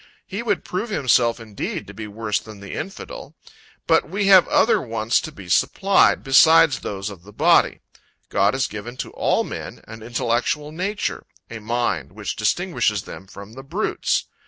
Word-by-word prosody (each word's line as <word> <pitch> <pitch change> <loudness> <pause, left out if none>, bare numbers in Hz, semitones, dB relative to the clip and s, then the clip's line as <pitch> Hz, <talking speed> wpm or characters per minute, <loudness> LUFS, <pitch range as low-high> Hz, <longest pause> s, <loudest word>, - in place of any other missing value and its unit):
he 200 +3 -5
would 210 -5 -1
prove 195 +6 -3
himself 125 - +2
indeed 110 -3 -5
to 105 - -11
be 105 +1 -7
worse 105 0 -2
than 110 -2 -12
the 100 -1 -9
infidel. - - -7 0.5
But 160 -2 +2
we 200 +3 -1
have 190 -2 +7
other 230 - +3
wants 110 -1 0
to - - -7
be 95 -3 -12
supplied, 195 - +3
beside 160 +4 +6
those 100 -5 -4
of 95 -4 -12
the 100 +4 -15
body. - - +3 0.5
God 100 +5 +2
has 135 0 +1
given 115 +4 -7
to - - -5
all - - +1
men - - -8
an 110 0 -10
intellectual 120 +5 -1
nature 190 +6 -3 0.2
a 115 - -6
mind, 110 - -2
which - - -5
distinguishes - - 0
them 95 - -10
from 100 +2 -11
the 135 - -9
brutes. 170 +11 -1
120 Hz, 170 wpm, -22 LUFS, 105-165 Hz, 0.5 s, have